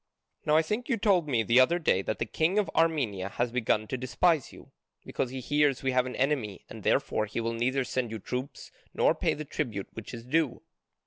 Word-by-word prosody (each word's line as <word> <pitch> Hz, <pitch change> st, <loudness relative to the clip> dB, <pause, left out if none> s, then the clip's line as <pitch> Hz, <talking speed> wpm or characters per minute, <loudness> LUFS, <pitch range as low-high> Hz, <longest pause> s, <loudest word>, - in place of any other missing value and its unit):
Now 150 Hz, +1 st, +5 dB
I 160 Hz, -, +4 dB
think 210 Hz, +9 st, -3 dB
you 235 Hz, -, +2 dB
told 195 Hz, -7 st, +2 dB
me 120 Hz, -6 st, +1 dB
the 115 Hz, +4 st, +4 dB
other 150 Hz, +7 st, +5 dB
day 150 Hz, -, +2 dB
that 110 Hz, -, -3 dB
the -, -, -1 dB
king 160 Hz, -, 0 dB
of 210 Hz, -, +1 dB
Armenia 130 Hz, -, +1 dB
has 120 Hz, +3 st, -1 dB
begun 115 Hz, -3 st, +1 dB
to 130 Hz, -, -2 dB
despise 150 Hz, +4 st, +1 dB
you, -, -, -15 dB, 0.3 s
because 125 Hz, -, -2 dB
he 130 Hz, +1 st, -6 dB
hears 145 Hz, 0 st, +1 dB
we 130 Hz, -, +1 dB
have 125 Hz, 0 st, +2 dB
an 125 Hz, -, -6 dB
enemy, 130 Hz, -8 st, -1 dB
and -, -, -8 dB
therefore 110 Hz, -, +1 dB
he 110 Hz, -, -4 dB
will 115 Hz, 0 st, -1 dB
neither 130 Hz, +4 st, 0 dB
send 125 Hz, -1 st, -2 dB
you 110 Hz, -, -5 dB
troops 125 Hz, +6 st, -6 dB, 0.2 s
nor -, -, +4 dB
pay -, -, 0 dB
the 155 Hz, -, -6 dB
tribute 115 Hz, -10 st, -4 dB
which 115 Hz, -, -8 dB
is 115 Hz, -1 st, -8 dB
due." 150 Hz, 0 st, 0 dB
130 Hz, 220 wpm, -28 LUFS, 115-155 Hz, 0.3 s, Now